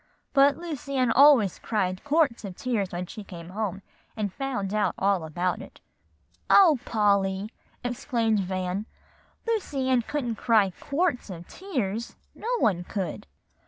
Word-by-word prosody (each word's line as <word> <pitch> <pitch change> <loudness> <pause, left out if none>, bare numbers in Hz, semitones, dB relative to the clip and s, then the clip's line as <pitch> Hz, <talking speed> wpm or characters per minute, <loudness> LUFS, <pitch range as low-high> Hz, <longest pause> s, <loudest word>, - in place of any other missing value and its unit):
But 275 0 +5
Lucy 300 -5 -5
Ann 255 -3 +3
always 265 - +6
cried 185 -4 -1
quarts 290 -5 +2
of 190 -3 -6
tears 215 -6 -1
when 175 +1 -3
she 210 +4 -9
came 170 -3 -10
home, 195 -1 -3 0.3
and 205 -3 -2
found 245 -7 -3
out 215 -1 +1
about 180 -2 0
it." - - -13 0.7
"O 330 -9 +7
Polly!" 200 -1 +1 0.3
exclaimed 235 -3 0
Van, 185 +2 -2 0.6
"Lucy 335 - -1
Ann 255 -2 +4
couldn't 240 -3 -3
cry 215 -5 +3
quarts 290 - -1
of 175 -2 -8
tears 235 - -3 0.2
no 455 - -6
one 185 - +2
could." 185 -3 -4
220 Hz, 135 wpm, -26 LUFS, 190-270 Hz, 0.7 s, O